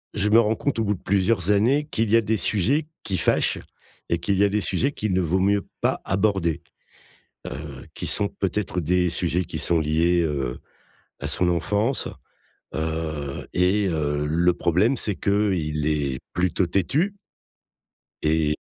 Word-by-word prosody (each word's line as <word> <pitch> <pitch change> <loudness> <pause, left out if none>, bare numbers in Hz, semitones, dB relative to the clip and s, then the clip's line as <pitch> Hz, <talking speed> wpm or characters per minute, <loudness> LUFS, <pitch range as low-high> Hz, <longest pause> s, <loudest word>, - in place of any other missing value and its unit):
je 105 0 +1
me 115 +2 +7
rends 110 0 +2
compte 140 0 -2
au - - +2
bout 105 - +1
de - - -15
plusieurs 100 0 +1
années, 130 +9 +3
qu'il 110 -5 0
y - - +6
a - - +4
des 110 +1 0
sujets 125 - +1 0.2
qui 95 -3 -2
fâchent - - +2 0.5
et 85 - +1
qu'il 100 +2 0
y 100 - +4
a - - +2
des 105 +1 0
sujets 140 +7 0
qu'il 105 -2 -2
ne 95 - +2
vaut 90 +3 +1
mieux 100 +1 +1
pas - - 0
aborder, 95 -5 +1 0.9
heu, 75 -2 -8
qui - - -5
sont 100 -1 0
peut-être 95 -1 -2
des 90 +2 +2
sujets 85 +1 0
qui - - -5
sont 85 -2 +1
liés, 85 +3 +2
heu, 70 -5 -2 0.6
à - - -4
son 90 -1 +2
enfance. 105 - 0 0.7
Heu, 80 -3 -3
et 95 +3 +2
heu, 75 -2 -1
le 85 +3 +3
problème 95 +10 +2
c'est 105 -4 -2
qu'il 90 -8 0
est 70 -4 0
plutôt 90 0 +1
têtu. 140 - 0 1.1
Et 75 -1 +2
90 Hz, 165 wpm, -24 LUFS, 80-105 Hz, 1.1 s, me